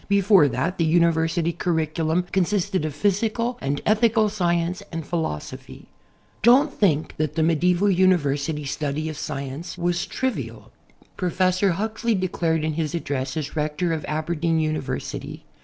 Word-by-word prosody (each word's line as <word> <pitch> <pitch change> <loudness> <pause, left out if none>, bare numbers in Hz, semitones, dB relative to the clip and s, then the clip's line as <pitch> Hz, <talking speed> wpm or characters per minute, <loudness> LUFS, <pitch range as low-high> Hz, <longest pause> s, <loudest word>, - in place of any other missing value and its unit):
Before 200 -5 +5
that 140 +8 -2
the - - +3
university 165 0 +2
curriculum 160 0 0
consisted 190 -2 0
of 150 -2 -4
physical 220 +7 0
and 140 +1 -2
ethical 215 0 +3
science 175 -1 0
and 165 -1 -4
])hilosophy. 160 - -5 0.6
Don't 265 +6 +5
think 160 -7 +1
that 155 -1 -1
the 160 - +2
medieval 175 +4 +2
university 160 -6 +2
study 150 +2 -2
of 155 - -6
science 140 +4 -5
was 175 0 -1
trivial. 260 -1 -4 0.5
Professor 185 +1 +1
Huxley 220 +4 -1
declared 170 -4 0
in 155 0 -1
his 155 0 -2
address 135 -4 -3
as 150 -2 -4
Rector 155 +3 -1
of 160 - -3
Aberdeen 160 +1 -1
University. 155 -3 -4
170 Hz, 135 wpm, -23 LUFS, 155-190 Hz, 0.6 s, Before